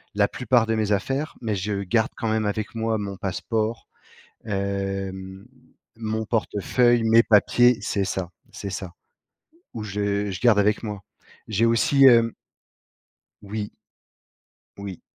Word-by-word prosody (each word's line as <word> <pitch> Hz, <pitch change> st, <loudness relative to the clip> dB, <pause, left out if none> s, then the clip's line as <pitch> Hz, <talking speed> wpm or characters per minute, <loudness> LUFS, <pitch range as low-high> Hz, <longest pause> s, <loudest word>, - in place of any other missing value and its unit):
la 100 Hz, -1 st, +3 dB
plupart 125 Hz, -1 st, +1 dB
de 115 Hz, -, +1 dB
mes 110 Hz, -1 st, 0 dB
affaires, 135 Hz, +9 st, -1 dB
mais 110 Hz, -3 st, -1 dB
je 100 Hz, +1 st, -2 dB
garde 110 Hz, +4 st, +1 dB
quand 115 Hz, -, -2 dB
même 110 Hz, -1 st, 0 dB
avec 105 Hz, +1 st, -3 dB
moi 115 Hz, 0 st, 0 dB
mon 100 Hz, -2 st, -5 dB
passeport, 110 Hz, +4 st, -2 dB, 0.6 s
hem, 95 Hz, -1 st, -4 dB, 0.5 s
mon 110 Hz, 0 st, -3 dB
portefeuille, 120 Hz, +2 st, +1 dB
mes 115 Hz, +1 st, +6 dB
papiers 120 Hz, +2 st, +4 dB
c'est 100 Hz, -, -1 dB
ça, 95 Hz, -2 st, -3 dB, 0.2 s
c'est 100 Hz, -, -6 dB
ça, 90 Hz, -2 st, -6 dB, 0.8 s
ou 110 Hz, -, -5 dB
je 100 Hz, 0 st, -1 dB
je 95 Hz, -, -5 dB
garde 120 Hz, -4 st, +4 dB
avec 105 Hz, +1 st, +2 dB
moi. 105 Hz, -2 st, -5 dB, 0.5 s
J'ai 110 Hz, +2 st, +2 dB
aussi, 115 Hz, +4 st, +4 dB
hem 115 Hz, -2 st, +6 dB, 1.1 s
Oui. 105 Hz, +1 st, -5 dB, 1.1 s
Oui. 100 Hz, -3 st, -7 dB
105 Hz, 135 wpm, -24 LUFS, 100-115 Hz, 1.1 s, mes